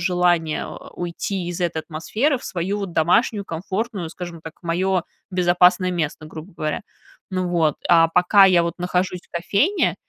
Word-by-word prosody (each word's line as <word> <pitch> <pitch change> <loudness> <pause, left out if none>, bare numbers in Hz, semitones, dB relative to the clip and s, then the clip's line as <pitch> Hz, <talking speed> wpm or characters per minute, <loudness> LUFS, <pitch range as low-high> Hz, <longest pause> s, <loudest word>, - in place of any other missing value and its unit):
желание 175 -3 +1 0.3
уйти 175 +1 -4
из 175 +1 -5
этой 170 -2 -1
атмосферы 220 - -1
в - - -13
свою 185 +3 -2
вот 195 -3 -4
домашнюю 200 +6 +2
комфортную, 190 +2 -4
скажем 175 -2 -8
так, 160 0 -9
мое 180 +2 0 0.3
безопасное 180 0 +3
место, 155 -2 -3
грубо 160 +4 -10
говоря. 155 -2 -2 0.5
Ну 185 -1 -1
вот, 160 -4 +1
а 165 -1 +6
пока 180 +4 +5
я 175 -3 +4
вот 170 -1 -2
нахожусь 180 0 -1
в - - -28
кофейне, 200 - +1
175 Hz, 155 wpm, -22 LUFS, 170-190 Hz, 0.5 s, а